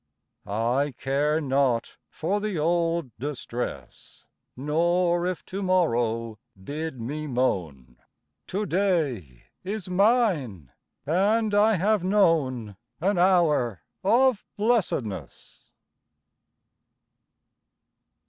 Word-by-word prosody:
I 120 +7 0
care 145 +3 +1
not 135 -5 0
for 195 +6 -2
the 210 -4 -2
old 165 -4 0
distress, 125 -3 -6 0.3
Nor 170 +5 +1
if 185 -1 -4
to 195 +2 -5
morrow 115 - 0 0.2
bid 150 +2 -5
me 150 +7 -4
moan; 85 - -2 0.5
To 205 +3 -2
day 150 - -1 0.2
is 190 -1 -5
mine, 180 - +1 0.3
and 205 +7 +2
I 210 +1 +4
have 200 +2 +1
known 150 - +1 0.2
An 185 +2 +1
hour 155 - +2 0.2
of 235 +3 +3
blessedness. 170 - -2
160 Hz, 85 wpm, -26 LUFS, 120-190 Hz, 0.5 s, I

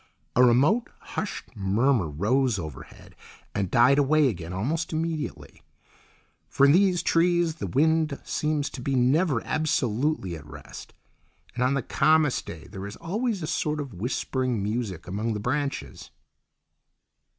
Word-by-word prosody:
A 125 - +6
remote, 140 - +4 0.2
hushed - - -5
murmur 105 - +1
rose 110 - +1
overhead 80 -7 -9 0.4
and 95 -2 -1
died 125 +7 +5
away 145 0 +4
again 85 -6 -6
almost 145 - -2
immediately; 160 -1 -4 0.9
for 140 - +4
in 140 - +6
these 180 +1 +3
trees 170 -1 +2
the - - -4
wind 155 +1 +2
seems 150 -1 -1
to 130 - -7
be 135 +2 -1
never 130 +2 +2
absolutely 130 - 0
at 80 - -10
rest, - - -11 0.6
and 125 - -1
on 130 +2 +2
the 140 - -1
calmest 155 -1 +2
day 80 -2 -8
there 95 0 -7
is 100 - -8
always 210 +1 -2
a - - -1
sort 150 0 -1
of 140 -5 -5
whispering 120 +2 -2
music 105 -5 -3
among 105 +5 -2
their 105 - -3
branches. 130 - -3
135 Hz, 140 wpm, -26 LUFS, 105-155 Hz, 0.9 s, A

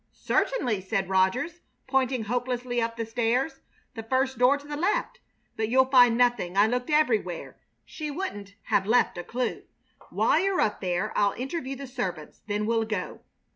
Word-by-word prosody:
"Certainly," 245 - +1
said 190 0 -2
Rogers, 195 - +1 0.3
pointing 260 -3 +1
hopelessly 245 +1 -2
up 230 0 -2
the 230 - -2
stairs; 240 +5 0 0.3
"the 225 - -6
first 260 +2 0
door 255 +3 +5
to 285 - -14
the 295 - -4
left. 485 +9 -1 0.4
But 220 0 -1
you'll 260 +2 +5
find 245 -3 +6
nothing. 240 -7 +1
I 205 - +6
looked 250 +4 -1
everywhere. 225 - 0 0.3
She 305 0 -6
wouldn't 205 - -5
have 190 - +1
left 230 -5 +2
a - - -4
clue. 250 +5 -3 0.5
While - - +2
you're 390 -1 +1
up 210 - 0
there 185 +2 -1
I'll 200 -1 +2
interview 270 +1 -4
the 275 +1 -7
servants. 190 - -5
Then 210 0 -1
we'll 225 0 +1
go." 215 -4 -4
245 Hz, 170 wpm, -27 LUFS, 210-265 Hz, 0.5 s, find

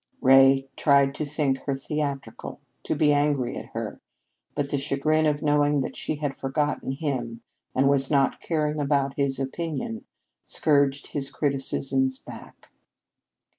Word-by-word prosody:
Ray 135 0 +5
tried 140 -1 +3
to 155 - -3
think 140 -2 0
her 140 - 0
theatrical, 140 0 -4 0.3
to - - -1
be 150 -1 +3
angry 145 -3 +1
at - - -7
her, - - -6 0.5
but 145 -1 -2
the 140 - 0
chagrin 155 +3 +1
of 145 -1 -1
knowing 145 -1 +2
that - - -5
she 155 - -3
had 145 -2 -3
forgotten 145 0 -2
him, 130 -6 -3 0.3
and 135 +1 +3
was 140 -1 +3
not 140 -2 +2
caring 155 -2 -1
about 140 -1 +1
his 135 -2 +2
opinion, 135 -4 -4 0.4
scourged 140 -2 +1
his 140 -2 -1
criticisms 135 -2 0
back. - - -13
140 Hz, 140 wpm, -25 LUFS, 135-150 Hz, 0.5 s, Ray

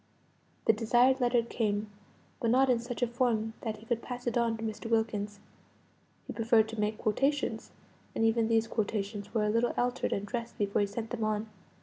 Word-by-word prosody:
The - - +6
desired 245 +4 +3
letter 240 -1 +3
came; 210 -2 -1 0.5
but 230 - +1
not 260 +2 +5
in 240 - +2
such 240 +1 -4
a - - +3
form 230 -2 0
that 220 -2 -3
he 215 - -14
could 230 0 -1
pass 245 0 -6
it 240 - -1
on 235 -2 +2
to 225 - -7
Mr. 220 +1 -4
Wilkins; 210 -2 0 0.9
he - - -6
preferred 225 -1 +3
to 225 -1 -6
make 210 +1 0
quotations, 270 +7 0 0.5
and 225 - +2
even 225 0 +3
these 225 0 +3
quotations 205 -2 -2
were 220 -2 +1
a 210 - +2
little 230 +2 +1
altered 245 +1 0
and 200 - -1
dressed 235 +2 -5
before 205 -1 +1
he 205 - +2
sent 220 +3 -5
them 235 -3 -2
on. 215 0 -1
225 Hz, 200 wpm, -30 LUFS, 215-240 Hz, 0.9 s, The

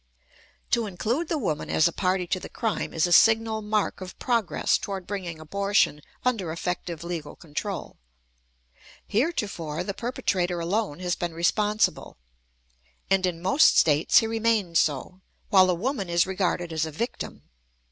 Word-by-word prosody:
To 235 -2 +2
include 230 - -2
the 325 - -1
woman 165 - -2
as 155 - +4
a - - -1
party 185 -1 0
to 185 +2 -1
the - - -9
crime 225 -3 -2
is 160 - +1
a 175 - -2
signal 220 +3 +5
mark 210 -2 -1
of 185 0 -8
progress 230 -7 +1
toward 195 -2 -5
bringing 180 -5 -5
abortion 200 -1 +1 0.2
under 215 -10 0
effective 170 0 -4
legal 170 -4 -5
control. 175 +6 -5 1.1
Heretofore, 200 - -1
the 200 - -4
perpetrator 185 -6 -1
alone 180 -1 -1
has 180 -1 0
been 170 -2 -4
responsible, 210 +5 +1 0.9
and 190 -1 +3
in 170 -1 -4
most 230 +12 +5
States 150 0 +4
he 225 - +6
remains 220 -6 +1
so, 155 +6 -1 0.3
while 190 -2 +7
the 180 - +2
woman 205 0 -2
is 170 0 +3
regarded 180 -3 -1
as 160 0 0
a - - -6
victim. 230 - -5
185 Hz, 150 wpm, -26 LUFS, 170-215 Hz, 1.1 s, while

